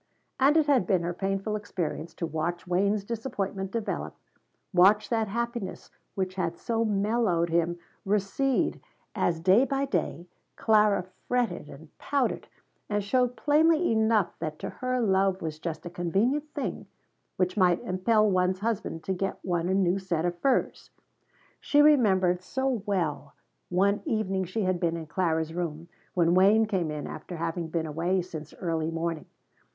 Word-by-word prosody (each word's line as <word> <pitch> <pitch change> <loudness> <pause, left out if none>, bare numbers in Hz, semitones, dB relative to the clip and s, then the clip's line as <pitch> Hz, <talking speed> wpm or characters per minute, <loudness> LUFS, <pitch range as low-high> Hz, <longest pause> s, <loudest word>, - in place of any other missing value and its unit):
And 280 +4 +5
it 315 - +4
had 265 -10 +3
been 185 -4 +2
her 175 +1 -2
painful 195 +3 -2
experience 175 -5 -4
to 170 - -3
watch 165 +3 -3
Wayne's 200 +3 +1
disappointment 200 -4 -3
develop, 225 +1 -3 0.6
watch 195 +4 +5
that 225 -2 +1
happiness 235 -1 -4 0.2
which 185 -1 -2
had 170 -3 -2
so 230 -1 -1
mellowed 205 -5 +1
him 170 +1 +1 0.3
recede 210 +7 0 0.3
as 165 -2 0
day 190 +8 +5
by 275 0 0
day 175 -9 -2 0.3
Clara 210 -3 +3 0.2
fretted 235 -11 -1
and 155 +3 -13
pouted 280 -3 -1 0.4
and 205 -1 0
showed 250 +4 +1
plainly 315 +2 +3
enough 220 -3 +2
that 155 -1 -4
to - - -5
her 255 0 -2
love 195 -3 +2
was 155 -3 -5
just 160 0 -5
a - - -4
convenient 230 - 0
thing 285 - -4 0.5
which 185 -1 0
might 180 -3 +3
impel 215 +4 +2
one's 185 -1 +1
husband 215 -7 -2
to 190 - -1
get 195 +1 -2
one 175 -1 0
a - - +2
new 190 0 +2
set 175 -4 -1
of 175 0 -1
furs. 270 +3 0 0.7
She 290 - +2
remembered 195 -12 +4
so 265 +2 -1
well 160 -7 -2 0.3
one 200 +3 +2
evening 195 - -1
she 200 +5 -2
had 185 -1 0
been 170 -1 0
in 165 - -6
Clara's 160 -1 -1
room 170 -1 -4 0.3
when 170 -1 +3
Wayne 200 +4 +5
came 190 -7 -1
in 150 -1 -4
after 175 - -7
having 165 +1 -3
been 160 0 -2
away 170 +4 0
since 155 -4 -8
early 165 -3 -1
morning. 165 -1 -3
190 Hz, 155 wpm, -27 LUFS, 170-220 Hz, 0.7 s, And